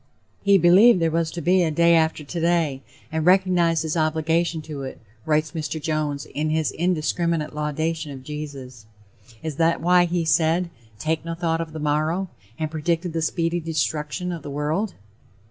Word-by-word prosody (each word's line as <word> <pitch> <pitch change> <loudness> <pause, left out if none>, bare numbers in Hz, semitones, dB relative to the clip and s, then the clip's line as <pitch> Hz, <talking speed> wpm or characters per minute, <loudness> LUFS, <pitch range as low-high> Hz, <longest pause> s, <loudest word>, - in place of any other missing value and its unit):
"He 200 -1 +5
believed 190 +5 +6
there 165 -1 +1
was 165 0 0
to 170 +1 -6
be 180 +4 +3
a 170 - +2
day 170 +2 +4
after 160 -2 +2
today, 165 -3 0 0.3
and 160 0 -1
recognized 180 -2 +3
his 160 0 -2
obligation 160 +1 0
to 150 -3 -7
it," 130 -1 -7 0.3
writes 155 0 +1
Mr. 155 0 -4
Jones 150 -2 -2
in 155 +1 -3
his 155 0 0
indiscriminate 170 -2 -1
laudation 155 +1 -2
of 135 -2 -9
Jesus. 135 -6 -8 0.6
Is 155 -3 -4
that 165 0 +2
why 180 +1 +4
he 175 -1 -1
said 165 +2 +2 0.3
"Take 155 +3 -1
no 165 0 -4
thought 165 -1 -1
of 165 -1 -6
the 155 - -7
morrow," 155 +5 0 0.3
and 155 -1 -3
predicted 165 +2 -1
the 165 - -1
speedy 165 +1 0
destruction 160 +2 -2
of 170 -2 -5
the 145 - -8
world? 155 +8 -2
160 Hz, 170 wpm, -23 LUFS, 155-170 Hz, 0.6 s, believed